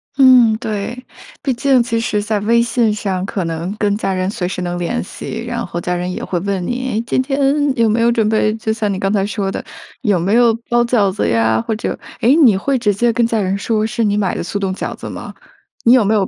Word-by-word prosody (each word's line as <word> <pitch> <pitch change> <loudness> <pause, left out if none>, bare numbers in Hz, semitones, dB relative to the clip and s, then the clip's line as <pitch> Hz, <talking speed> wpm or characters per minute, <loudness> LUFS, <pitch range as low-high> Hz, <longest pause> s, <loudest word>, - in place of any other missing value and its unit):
嗯， 255 -5 +6
对。 220 0 -4 0.5
毕 270 - +1
竟 260 +1 +3
其 230 -1 -1
实 210 -2 -1
在 215 -1 -1
微 235 +3 +3
信 235 -1 +1
上 190 -3 -2
可 195 -2 -3
能 165 +3 -3
跟 205 -2 +1
家 195 - -1
人 185 0 -1
随 180 -3 -3
时 180 - -4
能 175 0 -3
联 175 - -2
系， 225 +4 -7
然 235 -1 -3
后 170 - -5
家 180 +1 -2
人 180 +1 -3
也 - - -5
会 175 - -2
问 190 -1 -2
你： 255 +4 -3
“诶， 225 - +1
今 260 - +1
天 270 +1 -2 0.4
有 230 -1 +3
没 220 +2 +1
有 235 +1 +4
准 225 -3 +1
备” 215 0 +2
就 220 0 -2
像 215 -2 -1
你 190 - -2
刚 195 0 -1
才 195 -2 +1
说 200 -2 -2
的， - - -5 0.4
“有 210 -7 +2
没 195 +5 0
有 235 -1 +5 0.2
包 240 0 +3
饺 215 -5 +2
子 210 - -1
呀， 110 -1 +2
或 220 - -2
者 215 - -3 0.2
“诶， 255 +6 +5
你 245 -12 +5
会 270 +7 0
直 210 -3 +2
接 235 +3 +1
跟 235 0 +2
家 230 -1 0
人 195 -1 0
说 215 +1 0
是 235 +1 -1
你 205 -1 +1
买 195 -3 0
的 - - -3
速 200 - -4
冻 195 -2 -1
饺 - - -4
子 - - -8
吗？ - - -8 0.5
你 235 - +6
有 255 - +5
没 205 +2 +1
有 195 -3 +1
215 Hz, 275 characters per minute, -17 LUFS, 195-235 Hz, 0.5 s, 嗯